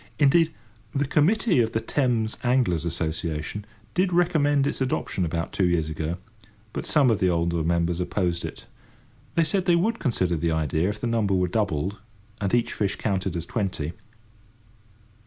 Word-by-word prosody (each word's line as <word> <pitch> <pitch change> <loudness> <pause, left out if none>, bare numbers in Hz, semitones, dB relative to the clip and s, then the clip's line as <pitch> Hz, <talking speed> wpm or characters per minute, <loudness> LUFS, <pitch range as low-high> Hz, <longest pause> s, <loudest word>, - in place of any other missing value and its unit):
Indeed, 160 +3 +4 0.4
the 140 +1 +2
Committee 175 - +3
of 115 -1 +1
the 110 - +1
Thames 115 -4 0
Angler's 120 - +2
Association 80 +3 -3 0.3
did 185 0 +2
recommend 155 -5 +3
its 145 - -2
adoption 125 -7 -1
about 85 +1 -3
two 95 - +2
years 85 -3 +1
ago, 80 +2 -3 0.6
but - - -4
some 140 -5 +4
of 110 - +1
the 95 - +3
older 85 -1 +1
members 85 +1 +1
opposed 90 -1 -1
it. 80 +7 -7 0.7
They 165 - +4
said 180 +4 0
they 175 - +4
would 220 +7 +1
consider 95 - 0
the 85 +2 0
idea 80 +3 +1
if 105 +1 -4
the - - -3
number 110 -4 +1
were 90 -1 +2
doubled, 95 -2 -1 0.4
and 100 -1 0
each 120 -1 +1
fish 100 -1 -1
counted 95 -3 -1
as 85 -1 -3
twenty. 90 -7 -2
100 Hz, 165 wpm, -25 LUFS, 85-140 Hz, 0.7 s, Indeed